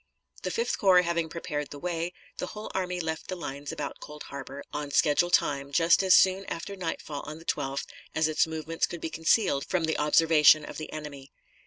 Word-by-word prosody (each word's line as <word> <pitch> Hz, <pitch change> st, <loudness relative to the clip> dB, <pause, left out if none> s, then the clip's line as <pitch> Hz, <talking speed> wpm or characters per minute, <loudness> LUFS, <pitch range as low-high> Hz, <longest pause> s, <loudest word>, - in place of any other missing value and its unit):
The -, -, -2 dB
Fifth 465 Hz, +1 st, -1 dB
Corps 185 Hz, -3 st, +6 dB
having 170 Hz, -1 st, -1 dB
prepared 150 Hz, -3 st, -4 dB
the 145 Hz, -, -8 dB
way, 170 Hz, +2 st, -3 dB, 0.3 s
the -, -, -2 dB
whole 210 Hz, +2 st, -7 dB
army 180 Hz, -1 st, -2 dB
left 160 Hz, -2 st, -4 dB
the 185 Hz, -, -3 dB
lines 145 Hz, -4 st, -6 dB
about 140 Hz, -2 st, -5 dB
Cold 150 Hz, 0 st, -9 dB
Harbor 140 Hz, 0 st, -8 dB
on 145 Hz, -1 st, -3 dB
schedule 150 Hz, +4 st, +3 dB
time, 140 Hz, -4 st, +1 dB
just 165 Hz, +4 st, +4 dB
as 190 Hz, -1 st, +6 dB
soon 190 Hz, +1 st, +4 dB
after 170 Hz, +4 st, -5 dB
nightfall 165 Hz, -5 st, -4 dB
on 155 Hz, +1 st, -6 dB
the 165 Hz, -, -14 dB
12th 135 Hz, -3 st, -2 dB, 0.3 s
as 160 Hz, 0 st, +3 dB
its 155 Hz, +1 st, +2 dB
movements 160 Hz, +1 st, -2 dB
could 175 Hz, -, -7 dB
be 160 Hz, -, -5 dB
concealed 160 Hz, -3 st, +2 dB
from 180 Hz, -3 st, -1 dB
the 160 Hz, 0 st, 0 dB
observation 150 Hz, 0 st, +5 dB
of -, -, -8 dB
the 155 Hz, -, -7 dB
enemy. 145 Hz, -3 st, -8 dB
160 Hz, 200 wpm, -28 LUFS, 150-175 Hz, 0.3 s, Corps